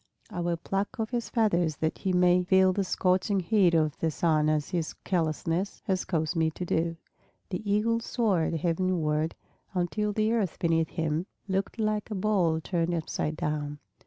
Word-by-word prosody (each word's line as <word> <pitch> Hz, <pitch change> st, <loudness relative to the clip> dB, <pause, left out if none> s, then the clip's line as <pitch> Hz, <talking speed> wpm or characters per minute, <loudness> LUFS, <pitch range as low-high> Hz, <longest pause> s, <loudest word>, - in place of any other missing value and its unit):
I 190 Hz, -, -4 dB
will 170 Hz, -1 st, 0 dB
pluck 195 Hz, +7 st, -3 dB
off 220 Hz, +1 st, -2 dB
his 240 Hz, -2 st, -2 dB
feathers 175 Hz, -9 st, +2 dB
that 160 Hz, +2 st, -2 dB
he 190 Hz, -, -1 dB
may 180 Hz, 0 st, +4 dB
feel 190 Hz, +1 st, +4 dB
the 200 Hz, -, 0 dB
scorching 185 Hz, +2 st, +1 dB
heat 185 Hz, -2 st, +3 dB
of 155 Hz, -3 st, +2 dB
the 165 Hz, -, +1 dB
sun 155 Hz, -1 st, +2 dB
as 155 Hz, -1 st, 0 dB
his 170 Hz, -4 st, -2 dB
carelessness 165 Hz, +2 st, -1 dB
has 190 Hz, -1 st, 0 dB
caused 160 Hz, -1 st, -1 dB
me 160 Hz, -1 st, +2 dB
to 180 Hz, +3 st, -6 dB
do." 165 Hz, 0 st, 0 dB, 0.5 s
The 200 Hz, +2 st, -3 dB
Eagle 230 Hz, +3 st, +2 dB
soared 205 Hz, -9 st, 0 dB
heavenward, 165 Hz, -2 st, 0 dB, 0.4 s
until 210 Hz, +4 st, 0 dB
the 215 Hz, +1 st, +1 dB
earth 205 Hz, -7 st, 0 dB
beneath 165 Hz, -1 st, +1 dB
him 160 Hz, +2 st, -1 dB, 0.2 s
looked 195 Hz, +2 st, -1 dB
like 215 Hz, -1 st, -1 dB
a 215 Hz, -, -3 dB
bowl 185 Hz, -5 st, +2 dB
turned 170 Hz, 0 st, 0 dB
upside 155 Hz, -1 st, -2 dB
down. 145 Hz, -1 st, -2 dB
175 Hz, 170 wpm, -28 LUFS, 160-200 Hz, 0.5 s, may